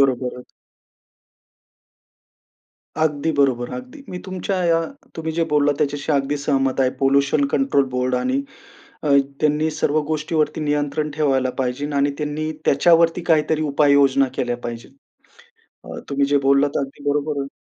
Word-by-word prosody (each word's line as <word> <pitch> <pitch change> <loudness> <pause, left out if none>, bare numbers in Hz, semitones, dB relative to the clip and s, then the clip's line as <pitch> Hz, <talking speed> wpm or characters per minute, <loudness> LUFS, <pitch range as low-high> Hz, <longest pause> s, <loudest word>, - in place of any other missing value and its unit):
बरोबर. 125 -2 0 2.6
अगदी 155 0 0
बरोबर, 125 -3 +2
अगदी. 255 +3 -9
मी 180 - -5
तुमच्या 185 0 -2
या 165 -1 +3 0.4
तुम्ही 160 0 -3
जे 165 +1 0
बोललात 145 -1 +3
त्याच्याशी 145 +2 -1
अगदी 140 0 0
सहमत 135 -2 0
आहे. 130 - +3
पोल्यूशन 140 +1 +2
कंट्रोल 140 0 +2
बोर्डनी 125 - 0 0.6
अ, - - -4
आणि 140 -1 +6 0.2
त्यांनी 155 +1 +1
सर्व 155 0 0
गोष्टीवरती 155 0 -1
नियंत्रण 150 0 -1
ठेवायला 135 -4 +1
पाहिजे 135 +3 -2
आणि 140 0 +2
त्यांनी 150 +1 -3
त्याच्यावरती 165 +4 +4
काहीतरी 155 -1 +2
उपाययोजना 140 -2 +3
केल्या 120 -2 -1
पाहिजेत. 120 -1 -8 0.9
अ, - - -8
तुम्ही 140 0 +1
जे 145 0 +2
बोललात 140 +1 +4
ते - - +1
अगदी 140 +1 -5
बरोबर 145 0 -1
आहे. 140 - -4
145 Hz, 135 wpm, -21 LUFS, 135-155 Hz, 2.6 s, आणि